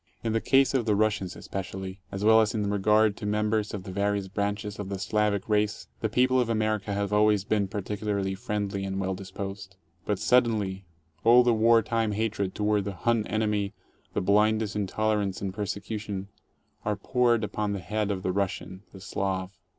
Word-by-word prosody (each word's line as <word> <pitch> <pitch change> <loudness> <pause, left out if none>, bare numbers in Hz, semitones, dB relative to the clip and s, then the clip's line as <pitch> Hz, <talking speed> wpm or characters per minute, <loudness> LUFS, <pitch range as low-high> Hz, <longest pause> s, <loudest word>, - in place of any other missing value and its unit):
In 115 -1 0
the 115 - +1
case 135 0 +4
of 125 -4 +1
the 105 - +3
Russians 105 -3 0
especially, 95 0 -6
as 100 +1 -4
well 110 +1 +7
as 110 +1 0
in 105 -2 0
regard 105 +1 +3
to 105 - -5
members 105 0 0
of 100 -3 -5
the 95 - -7
various 100 0 0
branches 105 +2 -3
of 100 -2 -5
the 100 - -3
Slavic 105 0 0
race, 105 -1 0
the 110 - -1
people 130 +3 +3
of 120 -2 +1
America 110 -2 0
have 100 0 -1
always 105 -1 +4
been 105 -1 +1
particularly 100 0 -2
friendly 100 0 -3
and 95 0 -3
well 95 0 -1
disposed. 95 0 -7 0.3
But 105 - -1
sud 125 +5 +4
denly 100 -4 -2 0.4
all 120 +2 +7
the 120 -1 +3
war 115 +1 +5
time 115 -1 0
hatred 105 -3 -1
toward 105 -1 +1
the 100 -1 -4
"Him 115 +3 +1
enemy," 105 -2 0 0.4
the - - +1
blindest 105 +2 +2
intolerance 105 -1 0
and 95 -2 -3
persecution 100 -1 -4 0.5
are 105 0 0
poured 120 +2 +2
upon 105 0 -2
the 100 - -3
head 105 +4 -2
of 95 -2 -2
the 95 - 0
Rus 100 0 0
sian, 95 0 -9
the 95 - -11
Slav. 95 -1 -2
105 Hz, 190 wpm, -27 LUFS, 100-110 Hz, 0.5 s, well